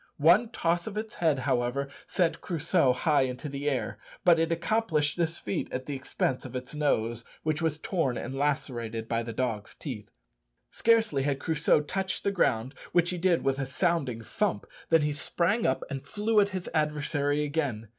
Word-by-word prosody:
One 175 +10 +5
toss 170 -4 0
of 210 -1 -5
its 215 0 -4
head, 160 -4 +2
however, 130 +1 0 0.2
sent 175 -3 0
Crusoe 165 -4 +2
high 150 +3 +2
into 130 +2 -2
the 140 +1 -2
air; 125 -6 -2 0.3
but 170 -2 +6
it 165 +1 +1
accomplished 165 -3 +1
this 165 -1 0
feat 100 - -3
at 130 0 -3
the 145 - -4
expense 130 -1 -1
of 130 -1 -8
its 125 +2 -5
nose, 120 -6 0 0.2
which 155 0 0
was 160 -2 0
torn 165 - -1
and - - -5
lacerated 125 -6 -2
by 115 0 0
the 115 0 -5
dog's 115 -3 -3
teeth. - - -7 0.6
Scarcely 225 -11 +3
had 140 0 0
Crusoe 155 -1 +2
touched 190 +5 -3
the 200 - +1
ground, 130 - +1 0.2
which 175 0 +3
he 180 - -3
did 175 -1 +2
with 135 0 +1
a 135 - -2
sounding 140 -5 0
thump, 205 - -1 0.2
than 165 -2 +5
he 150 0 0
sprang 175 +8 0
up 130 - 0
and 135 -1 -5
flew 210 +1 +1
at 200 -1 +4
his 185 -2 -5
adversary 150 -1 0
again. 140 -7 -2
150 Hz, 185 wpm, -28 LUFS, 130-170 Hz, 0.6 s, but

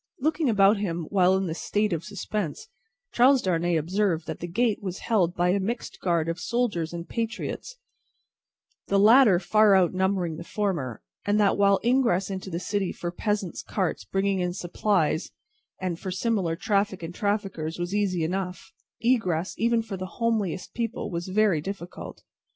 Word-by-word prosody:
Looking 310 0 +1
about 205 -1 +5
him 175 -4 -2
while 190 -1 +4
in 190 - -1
this 165 -1 -4
state 210 -2 0
of 165 -1 -2
suspense, 205 - -4 0.4
Charles 260 +3 +5
Darnay 175 -1 +1
observed 170 +1 0
that - - -5
the 175 - -5
gate 225 +5 0
was 185 -2 -5
held 180 -6 +1
by 175 +1 +2
a 195 +2 +2
mixed 230 +6 -4
guard 170 -3 +1
of 165 +1 -2
soldiers 220 -10 -1
and 170 0 -6
patriots, 230 - -4 1.1
the 200 - +2
latter 215 -1 +7
far 210 +3 +4
outnumbering 185 -2 +1
the 170 - -7
former; 170 - -3 0.2
and 205 +1 +1
that 205 -2 +4
while 200 -1 +4
ingress 235 -7 +2
into 190 0 -5
the 170 -1 -3
city 200 0 -1
for 175 - -5
peasants' 205 -1 -2
carts 190 -4 -2
bringing 195 0 0
in 180 -1 -1
supplies, 175 -2 0 0.5
and 180 -3 -3
for 190 - -5
similar 190 -3 0
traffic 200 -1 0
and 165 +1 -5
traffickers, 195 -6 -2
was 175 +2 -3
easy 195 -5 +1
enough, 180 +2 -3 0.3
egress, 190 -8 +1
even 230 0 +2
for 200 -3 -6
the 185 0 -5
homeliest 215 -6 -1
people, 235 0 -3
was 170 +1 -4
very 190 -4 +2
difficult. 185 0 -7
190 Hz, 165 wpm, -26 LUFS, 175-210 Hz, 1.1 s, latter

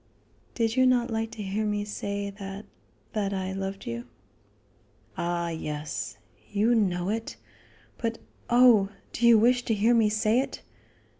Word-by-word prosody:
"Did 225 -1 0
you 255 -1 +5
not 245 -1 +2
like 225 0 -1
to 210 - -6
hear 200 +3 -2
me 210 -1 -1
say 200 -1 -4
that 195 0 -8 0.5
that 200 -2 -1
I 190 0 -3
loved 195 0 -5
you?" 115 +1 -5 1.1
"Ah, 170 0 -1
yes; 150 -9 -4 0.3
you 210 +4 +3
know 185 -5 +1
it. 225 +1 -3 0.6
But 230 -1 -2 0.3
oh! 240 -5 +6 0.2
do 235 - +2
you 235 -1 +8
wish 245 +3 +4
to 225 - +1
hear 220 +4 +3
me 225 -2 +4
say 215 +2 +2
it?" 270 - -4
210 Hz, 150 wpm, -27 LUFS, 195-230 Hz, 1.1 s, you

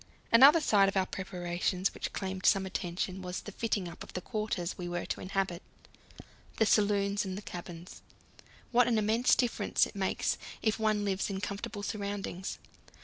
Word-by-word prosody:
Another 275 +8 +9
side 205 -10 +4
of 195 - -2
our 190 - +3
preparations 180 0 -2
which - - -4
claimed 190 -1 -2
some 195 -2 +4
attention 185 0 -3
was 180 0 -4
the 210 - -8
fitting 205 -3 -1
up 170 - -10
of - - -9
the - - -2
quarters 210 -5 -3
we 175 -1 -5
were 175 0 -3
to - - -4
inhabit, 190 -2 -2 1.0
the 220 - +4
saloons 205 -1 +2
and 195 +1 -5
cabins. 175 0 -8 0.7
What 245 0 +5
an 235 -2 +2
immense 220 +3 +3
difference 245 -3 +2
it - - -10
makes 195 -1 0 0.2
if 220 0 +1
one 215 -1 +1
lives 195 0 0
in 195 -1 -3
comfortable 205 +1 -5
surroundings. 200 -3 -4
195 Hz, 165 wpm, -31 LUFS, 185-215 Hz, 1.0 s, Another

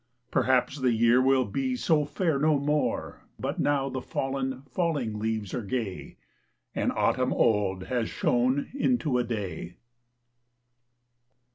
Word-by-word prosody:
Perhaps 130 +3 +2
the 130 -2 +2
year 120 +2 +4
will 130 -1 +3
be 260 -2 -1
so 160 -11 +2
fair 150 0 0
no 155 0 +3
more, 150 +2 -1 0.2
But - - -3
now 140 -2 +1
the 130 -1 -4
fallen, 135 0 -3
falling 135 -6 -2
leaves 110 -2 -2
are - - -1
gay, 105 -3 -4 0.6
And - - 0
autumn - - +1
old 100 -4 +2
has 120 +1 -1
shone 125 +3 +1
into 245 - +1
a - - +2
Day! 95 -7 -5
130 Hz, 130 wpm, -27 LUFS, 115-145 Hz, 0.6 s, year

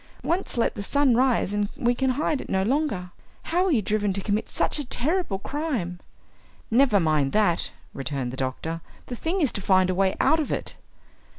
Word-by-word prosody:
Once 345 -5 -1
let 230 - +2
the 205 - -6
sun 280 +5 +2
rise 250 -5 +2
and 205 -1 0
we 240 0 +2
can 265 +2 0
hide 300 -2 0
it - - -10
no 190 0 +1
longer! 225 - -1 0.3
How 355 +3 +1
were 380 - +2
you 230 -8 +2
driven 205 0 0
to 195 - -2
commit 210 +2 -1
such - - 0
a - - -2
terrible 285 - 0
crime?" 230 - -3 0.7
"Never 235 -3 +5
mind 155 -5 +1
that," 205 -6 +2 0.2
returned 135 -3 -3
the - - -4
doctor, 135 +6 -3 0.2
"the 245 - -5
thing 340 +9 -1
is 285 - +3
to 200 - -4
find 185 -1 +3
a - - 0
way 190 +1 +1
out 315 - +4
of 300 - -2
it." - - -3
215 Hz, 200 wpm, -25 LUFS, 185-280 Hz, 0.7 s, Never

